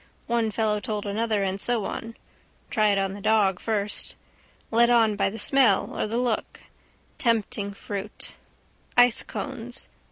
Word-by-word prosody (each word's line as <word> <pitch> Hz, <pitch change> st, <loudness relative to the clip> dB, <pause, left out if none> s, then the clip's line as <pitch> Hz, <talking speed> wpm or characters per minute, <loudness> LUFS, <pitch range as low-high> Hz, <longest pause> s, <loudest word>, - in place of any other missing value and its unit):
One 235 Hz, -1 st, +1 dB
fellow 215 Hz, -1 st, 0 dB
told 210 Hz, 0 st, -4 dB
another 210 Hz, 0 st, 0 dB
and 195 Hz, 0 st, -2 dB
so 235 Hz, -4 st, 0 dB
on. 230 Hz, 0 st, -5 dB, 0.6 s
Try 215 Hz, -2 st, +3 dB
it 200 Hz, -1 st, +3 dB
on 195 Hz, 0 st, 0 dB
the 200 Hz, -, -8 dB
dog 195 Hz, -4 st, +3 dB
first. 210 Hz, -2 st, -2 dB, 0.5 s
Led 235 Hz, +1 st, +5 dB
on 225 Hz, -3 st, +4 dB
by 195 Hz, -1 st, +1 dB
the 215 Hz, -, -7 dB
smell 240 Hz, -2 st, +4 dB
or -, -, -1 dB
the 225 Hz, +2 st, -2 dB
look. 245 Hz, -3 st, -1 dB, 0.6 s
Tempting 225 Hz, -3 st, 0 dB
fruit. 200 Hz, -1 st, -6 dB, 0.6 s
Ice 245 Hz, -2 st, +6 dB
cones. 245 Hz, -1 st, -5 dB
220 Hz, 150 wpm, -26 LUFS, 200-235 Hz, 0.6 s, Ice